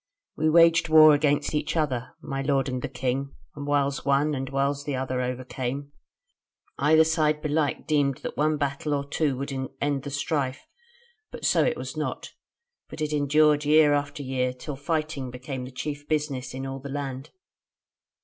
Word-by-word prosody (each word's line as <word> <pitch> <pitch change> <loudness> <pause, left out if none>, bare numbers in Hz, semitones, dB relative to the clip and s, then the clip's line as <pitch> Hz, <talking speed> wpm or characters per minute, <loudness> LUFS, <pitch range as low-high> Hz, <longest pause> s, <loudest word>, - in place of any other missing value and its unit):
"We 155 +1 +1
waged 165 +1 +5
war 155 -1 +8
against 145 0 +1
each 150 +1 -1
other, 130 -6 -1
my 135 -1 -3
lord 135 -1 +1
and 130 -1 -3
the - - -4
king, 130 +2 -3 0.2
and 145 0 -6
whiles 140 -1 +1
one, 140 +2 +2
and 135 -1 -3
whiles 140 +1 0
the 145 -2 -3
other 130 -1 -2
overcame. 130 +2 -4 0.9
Either 155 +3 +5
side 155 -1 +1
belike 150 -1 -1
deemed 145 -3 +1
that - - -5
one 155 +1 +1
battle 145 +1 -1
or 140 0 -3
two 145 -2 0
would 140 +1 -4 0.3
end 145 -1 0
the 145 - -6
strife; 140 -1 -2 0.6
but - - -7
so - - +4
it 485 - 0
was - - -6
not, - - -4 0.6
but - - -9
it 155 0 -2
endured 150 +1 +3
year 150 0 +5
after 145 0 -2
year, 130 -1 -1
till 135 +3 -7
fighting 155 -2 -2
became 125 +1 -6
the 130 - -9
chief 145 +2 -5
business 145 -5 -2
of 135 0 -5
all 135 0 -4
in - - -11
the 140 - -7
land. 135 -1 -5
145 Hz, 180 wpm, -26 LUFS, 135-150 Hz, 0.9 s, war